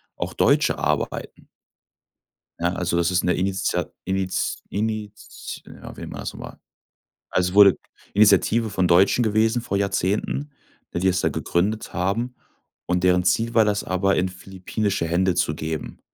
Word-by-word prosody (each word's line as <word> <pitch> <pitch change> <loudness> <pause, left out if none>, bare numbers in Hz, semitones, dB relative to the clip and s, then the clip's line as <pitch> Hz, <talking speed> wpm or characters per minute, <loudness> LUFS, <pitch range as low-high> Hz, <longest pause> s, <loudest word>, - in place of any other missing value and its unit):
auch - - -4
Deutsche - - +3
arbeiten. 75 0 -3 1.1
Ja, 85 +1 +1
also, 90 -2 -1
das 85 +1 +2
ist 90 - +2
'ne 90 - +1
Initia 95 -3 -1 0.2
Init 95 0 -1
Init 105 0 -5 0.2
ah, - - -9
wie - - -12
nennt - - -7
man - - -6
das - - -5
noch - - -10
mal. - - -9 0.7
Also, 90 -1 +1
es - - -9
wurde 100 -2 +8 0.4
Initiative 110 +2 +4
von 95 -2 +1
Deutschen 95 +7 +4
gewesen 110 +2 +2
vor 100 - -2
Jahrzehnten, 100 +8 -1 0.4
ne, 85 - -1
die 95 - +1
es 90 -1 +2
da - - +2
gegründet 105 +5 -1
haben 110 +8 -1 0.5
und 90 0 +1
deren 90 -1 +4
Ziel 115 +6 +1
war, 115 -1 +5
das 105 -1 0
aber 95 +1 +1
in 90 - +1
philippinische 95 0 -3
Hände 90 +1 +1
zu 85 -4 0
geben. 80 0 -5
95 Hz, 165 wpm, -23 LUFS, 90-105 Hz, 1.1 s, wurde